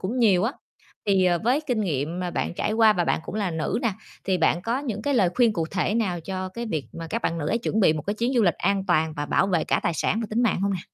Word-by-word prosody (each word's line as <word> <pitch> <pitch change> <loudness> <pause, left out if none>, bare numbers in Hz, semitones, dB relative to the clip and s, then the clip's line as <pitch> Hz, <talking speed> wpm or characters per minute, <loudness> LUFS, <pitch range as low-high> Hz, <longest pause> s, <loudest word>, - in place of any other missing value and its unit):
cũng 220 +7 -3
nhiều 200 -7 +4
á, 235 - 0 0.5
thì, 195 -2 +3
ờ, 175 -1 +3
với 255 +5 +3
kinh 245 -6 0
nghiệm 160 -1 -2
mà 180 -1 -2
bạn - - -2
trải 210 - -1
qua 220 -1 +5
và 175 -4 0
bạn - - 0
cũng - - -7
là 205 -4 -1
nữ 160 +4 -1
nè, 230 -4 +1 0.3
thì 190 -2 +1
bạn 170 +1 +2
có 235 +4 -1
những 230 -7 -4
cái 285 +2 0
lời 195 -7 +4
khuyên 240 -3 +4
cụ 165 -5 -2
thể 195 +2 0
nào 190 -7 0
cho 185 +2 -4
cái 235 +5 -6
việc 155 -10 -2
mà 165 0 -7
các 230 - -2
bạn 170 - -1
nữ 150 -1 -2
ấy 230 - +1
chuẩn 220 -2 -1
bị 170 - +5
một 155 -1 -4
cái 205 +6 -2
chuyến 235 +4 -1
du 240 - +4
lịch 175 -5 +3
an 200 -1 0
toàn 160 -3 +2
và 145 0 -3
bảo 190 - +2
vệ 180 -4 +1
cả - - +1
tài 170 - 0
sản 215 +8 0
và 225 - -3
tính 230 +3 +1
mạng 220 -6 +1
hông 200 +1 +1
nè? 180 - -4
195 Hz, 305 wpm, -25 LUFS, 175-225 Hz, 0.5 s, qua